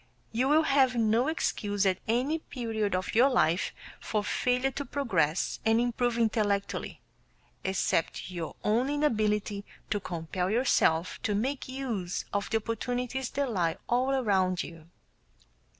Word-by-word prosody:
You 245 +4 +1
will 310 +2 +5
have 270 -4 +3
no 230 +2 +2
excuse 205 -10 0
at 190 -1 +2
any 255 +8 +1
period 225 -9 -2
of 185 0 -2
your 250 +5 +6
life 175 - +2 0.3
for 210 -1 -1
failure 250 +5 +1
to 285 - -4
progress 190 - 0
and 225 +1 +3
improve 240 0 0
intellectually, 210 -3 0 0.6
except 190 -2 0
your 170 -3 -5
own 235 +6 +2
inability 215 -8 0 0.3
to 205 - +1
compel 180 0 -3
yourself 195 -7 +2
to 210 -5 0
make 260 +7 -1
use 235 -9 -3
of 205 0 -1
the 225 - +2
opportunities 245 +3 -2
that 280 -2 -1
lie 170 -6 0
all 250 +2 +2
around 195 -9 +2
you. 165 -1 -11
225 Hz, 135 wpm, -29 LUFS, 195-255 Hz, 0.6 s, your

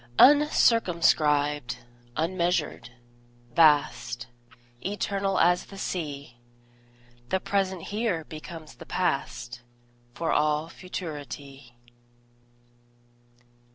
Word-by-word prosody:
Uncircumscribed, 160 - +4 0.4
unmeasured, 170 -4 0 0.6
vast, 145 -6 +3 0.6
Eternal 195 0 -1
as 175 +1 +3
the 195 - -12
Sea, 145 -10 -5 0.9
The 190 - +1
present 190 -3 -1
here 205 -6 -1
becomes 155 0 -9
the - - -13
past, 125 -8 -2 0.5
For 165 - -1
all 150 +1 +1
futurity. 145 -8 -8
165 Hz, 70 wpm, -27 LUFS, 145-185 Hz, 0.9 s, Uncircumscribed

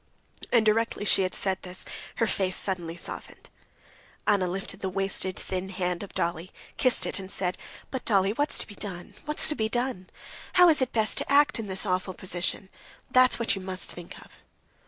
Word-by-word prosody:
And 230 -3 +4
directly 215 -1 +1
she 195 - +5
had 185 -1 0
said 190 -1 -1
this, 180 0 -1 0.3
her 230 - +2
face 190 -4 0
suddenly 175 -3 -1
softened. - - -4 0.8
Anna 200 -4 +3
lifted 190 +2 -4
the 190 - -2
wasted, 190 0 -1
thin 185 0 -4
hand 180 -2 -2
of 200 - -9
Dolly, 170 +1 -1 0.3
kissed 255 - +3
it - - 0
and 190 -1 -8
said: 185 -2 -1 0.4
"But, 260 - -4
Dolly, 195 -2 +3
what's 290 +5 0
to - - 0
be 205 - -11
done, 190 -4 -7
what's 300 0 +1
to 305 - +1
be 220 -3 0
done? 240 -6 -2 0.4
How 360 -1 +8
is 305 -4 +5
it 260 - +1
best 220 -2 +2
to - - -4
act 280 -4 +5
in 220 - -4
this 190 +2 -3
awful 185 -1 -1
position—that's 190 +7 0
what 235 - +1
you 195 - -6
must 185 0 0
think 175 -1 -9
of." - - -21
195 Hz, 190 wpm, -27 LUFS, 185-230 Hz, 0.8 s, How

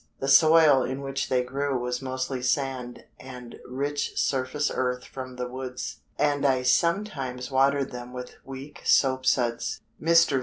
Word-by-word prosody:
The 135 - -3
soil 155 0 +6
in 130 +2 -3
which 135 0 -3
they 125 -1 +2
grew 135 +2 -2
was 125 +1 -3
mostly 130 0 -3
sand 125 -1 -2
and 125 -2 -10
rich 145 +3 -2
surface 135 +2 0
earth 125 -1 -1
from 130 -1 -8
the 125 0 -4
woods, 125 0 -6 0.2
and 145 -1 +1
I 130 -2 +2
sometimes 135 -6 0
watered 135 +1 +2
them 125 0 -8
with 125 0 -8
weak 135 +2 -9
soap 130 -1 +3
suds." 120 -2 +1 0.2
Mr. 165 -4 +4
130 Hz, 150 wpm, -26 LUFS, 125-140 Hz, 0.2 s, soil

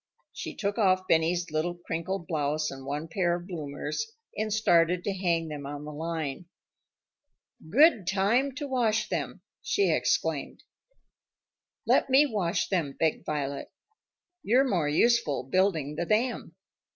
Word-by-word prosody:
She - - -6
took 205 +2 -2
off 185 -2 +3
Benny's 170 +1 +1
little 160 +3 -1
crinkled 175 +2 -4
blouse 150 -1 -1
and 135 0 -9
one 145 +3 -3
pair 175 +1 0
of 175 0 -7
bloomers, 170 - -4 0.2
and 215 0 -2
started 175 -4 +3
to 200 - -1
hang 170 -3 0
them 145 -2 -6
on 145 +1 -6
the 150 - -6
line. 160 0 -4 1.2
"Good 240 - +5
time 225 +8 +1
to 290 0 -4
wash 220 -5 +1
them!" - - -4 0.2
she 400 -1 +1
exclaimed. - - -1 1.2
"Let - - +3
me 270 +3 +6
wash 200 -8 -1
them," 165 -8 0
begged 160 -1 0
Violet. 140 -2 -3 0.7
"You're 255 +5 +3
more 170 - +1
useful 195 - +2
building 160 -2 +1
the 170 +3 -3
dam." 225 -6 0
175 Hz, 140 wpm, -28 LUFS, 155-215 Hz, 1.2 s, me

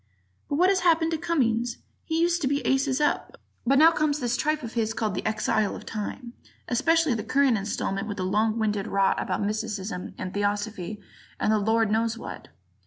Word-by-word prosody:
But 285 - 0
what 360 +5 +4
has 390 -1 +3
happened 330 -2 +3
to 325 - 0
Cummings? 240 -8 0 0.3
He 320 0 -1
used 345 +1 +2
to 275 - +1
be 280 +1 -1
aces 270 0 +1
up, 295 - 0 0.3
but 275 +2 +4
now 320 +3 +8
comes 305 -2 0
this 245 -2 0
tripe 305 +3 0
of 230 - -6
his 225 -1 -1
called 215 -4 -1
"The 185 - -3
Exile 215 -1 0
of - - -9
Time"; 235 +3 -5 0.3
especially 325 +3 +2
the 220 -2 -3
current 275 -3 +3
installment 195 0 -2
with 205 - -5
its 185 - -2
long 215 +4 +1
winded 210 -2 -1
rot 195 -1 +2
about - - -2
mysticism 210 -2 -3
and 185 - -5
theosophy 205 -1 -2 0.4
and - - +2
the 215 - +3
Lord 220 +1 +2
knows 225 +1 +1
what. - - -8
230 Hz, 195 wpm, -26 LUFS, 210-285 Hz, 0.4 s, now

